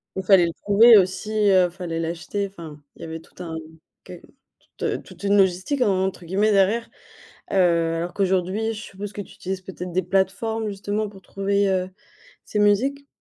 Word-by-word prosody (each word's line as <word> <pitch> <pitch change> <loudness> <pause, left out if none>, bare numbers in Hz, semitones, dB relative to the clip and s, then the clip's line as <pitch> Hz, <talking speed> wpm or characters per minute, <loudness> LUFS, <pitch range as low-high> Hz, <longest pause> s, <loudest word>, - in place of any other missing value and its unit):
Il 190 - -3
fallait 185 -2 +6
le 165 - -4
trouver 220 +3 +6
aussi, 190 +3 0 0.2
heu, 185 -2 +4
fallait 170 -2 -5
l'acheter, 175 +5 -3
enfin 165 -6 -11
il - - -16
y - - -5
avait 160 0 -6
tout 165 - -15
un 165 -1 -6 0.5
qu 180 - -10 0.6
toute - - -2
toute - - -15
une 200 0 +3
«logistique» 190 +8 +1
entre 190 -4 0
guillemets 200 +5 +1
derrière, 205 +4 +2 0.6
heu, - - 0 0.4
alors 175 +2 -4
qu'aujourd'hui, 190 +3 0
je 215 - -7
suppose 205 0 -8
que 205 - -6
tu 195 - -10
utilises 190 0 -5
peut-être 180 -1 -8
des 185 +1 +1
plateformes 195 +4 -1
justement 205 +2 -3
pour 195 -2 -14
trouver, 200 +1 0
heu, 185 -1 0 0.5
ces 210 - -3
musiques? 260 +8 +2
195 Hz, 175 wpm, -23 LUFS, 180-205 Hz, 0.6 s, fallait